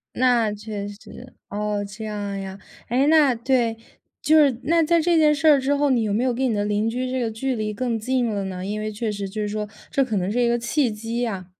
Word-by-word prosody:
那 240 -4 +3
确 205 -1 -6
实， 225 +5 -12
哦， 210 0 -2
这 200 +2 -8
样 205 -2 -4
呀。 190 0 -7 0.3
哎， 260 +4 +2
那 300 -4 +5
对， 235 -1 +1 0.4
就 315 - +4
是， 265 -5 +1
那 335 +1 +3
在 335 +2 +3
这 340 +1 +2
件 305 -2 +5
事 315 +2 -1
儿 290 -3 +7
之 280 +2 +1
后， 285 -1 +2
你 240 -3 +2
有 210 -2 -1
没 230 +5 +1
有 250 -2 +1
跟 260 +1 0
你 - - 0
的 205 - 0
邻 210 +2 0
居 255 +2 -2
这 260 0 -1
个 230 - -1
距 255 +4 -2
离 215 -1 -2
更 235 +1 -2
近 250 +2 0
了 205 -2 -2
呢？ 185 -1 -5
因 210 +1 -3
为 215 0 -3
确 215 +1 -3
实 200 -1 -4
就 215 +3 -5
是 210 - -1
说， 210 0 -3 0.2
这 275 -2 +2
可 225 -4 -3
能 185 0 -1
是 245 +4 0
一 240 - +3
个 240 - +1
契 240 +2 0
机 225 +3 -4
呀。 195 -7 -3
230 Hz, 275 characters per minute, -23 LUFS, 210-260 Hz, 0.4 s, 儿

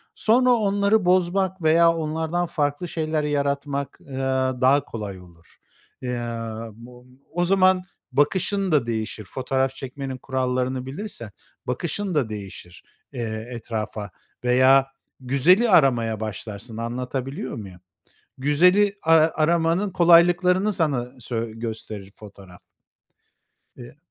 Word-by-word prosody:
sonra 250 +3 +3
onları 205 -2 +2
bozmak 185 +1 +1
veya 165 +1 +5
onlardan 160 +2 -2
farklı 145 +1 -2
şeyler 155 -2 -2
yaratmak, 140 -1 -2
aaa, 130 -1 -2
daha 140 +3 +4
kolay 105 -4 -6
olur. 85 -2 -19 0.4
Eee, 125 -1 -3 0.7
o 125 0 -16 0.3
o 175 +1 0
zaman 185 0 +3 0.3
bakışın 185 +7 +1
da 145 -6 +3
değişir. 110 -1 -3
Fotoğraf 130 +3 -1
çekmenin 135 0 -6
kurallarını 130 0 -2
bilirsen, 135 - -7 0.4
bakışın 170 +8 -3
da 135 -7 +1
değişir, 95 -4 -9 0.3
eee, 110 -3 -4
etrafa 110 -3 -5 0.3
veya 130 +2 +5 0.3
güzeli 145 - +3
aramaya 120 - +3
başlarsın, 110 +1 -6
anlatabiliyor 125 - -4
muyum? 95 -5 -9 0.6
Güzeli 180 +9 +3
a 165 - +2 0.2
aramanın 165 +4 +1
kolaylıklarını 180 +3 +4
sana 140 -9 0
söy 115 -1 -4
gösterir 110 -3 -6
fotoğraf. 100 -4 -14 1.2
Eee 120 +2 -12
135 Hz, 105 wpm, -23 LUFS, 120-175 Hz, 1.2 s, veya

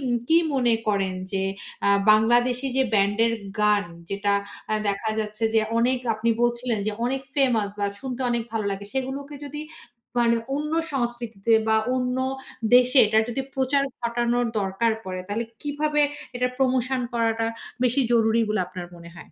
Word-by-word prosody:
কি, 245 -2 +1
কি 325 - +6 0.2
মনে 245 -3 +3
করেন? 195 -2 +1 0.2
যে 190 -1 0 0.4
আ - - +5 0.2
বাংলাদেশি 240 +4 +4
যে 265 - +4
ব্যান্ডের 205 +3 +3 0.3
গান 210 -1 +3 0.3
যেটা 200 +1 0 0.4
অ্যা 215 - +1
দেখা 200 +2 -1
যাচ্ছে 215 +1 -3
যে 220 - +5 0.2
অনেক 250 +2 +2 0.2
আপনি 225 +2 0
বলছিলেন, 240 -1 +1
যে 215 - 0
অনেক 265 +2 0
ফেমাস 245 -7 +2
বা 205 - +1
শুনতে 260 -1 -5
অনেক 235 -1 0
ভালো 220 -2 -1
লাগে, 195 +1 -4
সেগুলোকে 270 +2 -4
যদি 295 +1 -6 0.6
মানে 235 -1 +4 0.2
অন্য 300 +1 -3 0.2
সংস্কৃতিতে 235 -4 -2 0.2
বা 220 - +4 0.2
অন্য 250 0 -1 0.6
দেশে 250 +2 +6
এটার 220 +1 +3
যদি 240 +3 -2
প্রচার 270 +1 +2 0.2
ঘটানোর 240 0 0
দরকার 195 +4 0
পড়ে, 185 -1 -4
তাহলে 220 +3 -1 0.2
কিভাবে 295 +1 0 0.4
এটা 250 0 +1
প্রমোশন 260 0 +1
করাটা 225 -1 +1 0.4
বেশি 250 +3 +2
জরুরি 225 0 +3
বলে 210 -2 0
আপনার 180 -1 -7
মনে 170 0 -12
হয়? 170 - -14
235 Hz, 160 wpm, -24 LUFS, 215-255 Hz, 0.6 s, কি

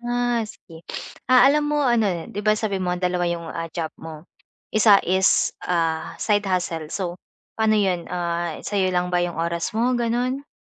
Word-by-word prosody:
Ah, 245 0 +1
sige 165 -5 -14 0.5
ah, 255 -1 +7
alam 300 +1 +2
mo 295 0 +1
ano 240 -5 +3 0.2
'di 205 - -4
ba 215 - +5
sabihin 200 -4 -2
mo - - +1
ang 180 - -8
dalawa 180 0 +1
'yong 170 -1 -3
ah, 165 0 -4
job 160 -3 -3
mo, 160 0 -9 0.5
isa 215 -2 +6
is 190 +1 +3 0.2
ah, 165 -2 -1
side 205 -1 +1
hustle 175 -4 -1
so 190 - -2 0.5
paano 220 -1 +3
'yon 185 -4 0
ah, 170 -2 -2
sa 205 -1 -2
'yo 185 - +2
lang 180 0 0
ba 180 - +2
'yong 175 -1 -3
oras 170 +5 -2
mo 240 +3 +2
ganon? 250 +4 -1
185 Hz, 185 wpm, -23 LUFS, 170-225 Hz, 0.5 s, ah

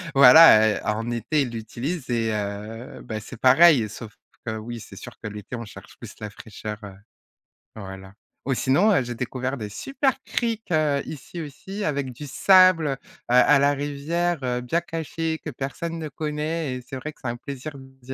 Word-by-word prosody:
Voilà, 130 -4 +9
heu, - - -4
en 110 +2 -1
été 120 +6 0
ils 135 - -1
l'utilisent 120 +7 -5
et 115 -2 0
heu, 105 +4 -5
bah 110 -1 -5
c'est 110 - -10
pareil 130 -2 +6
sauf 110 +1 -10 0.3
que 110 -2 -3
oui, 115 +2 -7
c'est - - -12
sûr - - -10
que - - -5
l'été 105 +2 -7
on 115 -1 -6
cherche 100 - -13
plus - - -10
la 105 - -5
fraîcheur, 105 0 -8
heu, 100 -1 -8 0.8
voilà. 95 -2 -9 0.3
Ou 135 - +1
sinon, 145 - +3
heu, 180 - +3
j'ai 120 0 -5
découvert 130 +2 -3
des 105 -4 -5
super 270 - -1
criques 230 -4 -3
heu, 150 -3 +2
ici 160 +3 -7
aussi 190 +7 -7
avec 140 -5 -1
du 145 +5 -9
sable. 185 +1 +5
Heu, 135 - -2 0.3
à 125 +4 +6
la 140 +1 +4
rivière, 145 +5 -1
heu, 125 -1 -1
bien 145 +8 0
caché 165 -1 -3
que - - -4
personne 150 +5 -5
ne 155 -2 -5
connaît 150 0 -3
et 125 - -6
c'est - - -7
vrai 140 +4 -5
que - - -27
c'est - - -3
un 120 0 -3
plaisir 140 +3 -7
d'y 130 -1 -11
135 Hz, 190 wpm, -24 LUFS, 115-155 Hz, 0.8 s, Voilà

